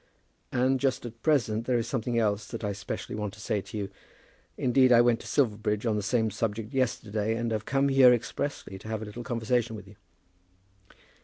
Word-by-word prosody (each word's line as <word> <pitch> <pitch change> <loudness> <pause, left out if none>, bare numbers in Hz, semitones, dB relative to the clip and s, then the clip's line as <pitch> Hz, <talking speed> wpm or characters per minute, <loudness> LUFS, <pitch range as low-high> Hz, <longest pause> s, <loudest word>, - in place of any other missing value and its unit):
"And 130 +1 +2
just 130 -2 0
at 115 0 -9
present 115 -8 +1
there 125 -2 +2
is 115 - -1
something 120 -2 -1
else 105 -2 +1
that 115 -1 -7
I 105 - 0
specially 100 0 -5
want 105 -1 -4
to - - -16
say 105 -1 -1
to 105 - -8
you. 100 -2 -3 0.7
Indeed, 130 +1 +4
I 120 - +8
went 120 -1 +4
to - - -10
Silverbridge 105 -4 0
on 110 -2 +1
the 105 - 0
same 110 +1 +1
subject 110 +3 -3
yesterday, 110 -4 0
and 115 0 -2
have 110 -1 -2
come 135 +1 +2
here 135 -2 +7
expressly 120 -4 -2
to 105 - -12
have 110 0 -3
a - - -6
little 110 +3 -7
conversation 120 -1 0
with 105 -2 -10
you." 100 0 -16
115 Hz, 205 wpm, -28 LUFS, 105-125 Hz, 0.7 s, I